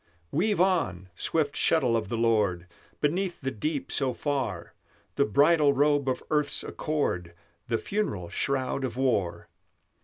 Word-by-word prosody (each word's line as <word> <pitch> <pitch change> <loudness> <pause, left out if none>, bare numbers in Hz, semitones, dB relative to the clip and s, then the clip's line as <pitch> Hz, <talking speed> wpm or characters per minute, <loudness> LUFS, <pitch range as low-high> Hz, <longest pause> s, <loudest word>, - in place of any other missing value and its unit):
Weave 205 +6 +1
on, 130 - +1
swift 150 - 0
shuttle 130 -8 +3
of 110 -3 -1
the 115 - -2
Lord, 105 -7 +1 0.4
Beneath 175 +5 0
the 135 -1 -3
deep 145 +5 -3
so 130 -2 0
far, 130 - -3 0.4
The - - +2
bridal 145 +6 +4
robe 145 -1 +2
of 130 - -2
earth's 150 -1 +1
accord, 90 - -2 0.3
The 115 - +1
funeral 105 - -2
shroud 135 +3 -1
of 125 -2 -3
war! 100 -10 0
135 Hz, 140 wpm, -27 LUFS, 105-150 Hz, 0.4 s, bridal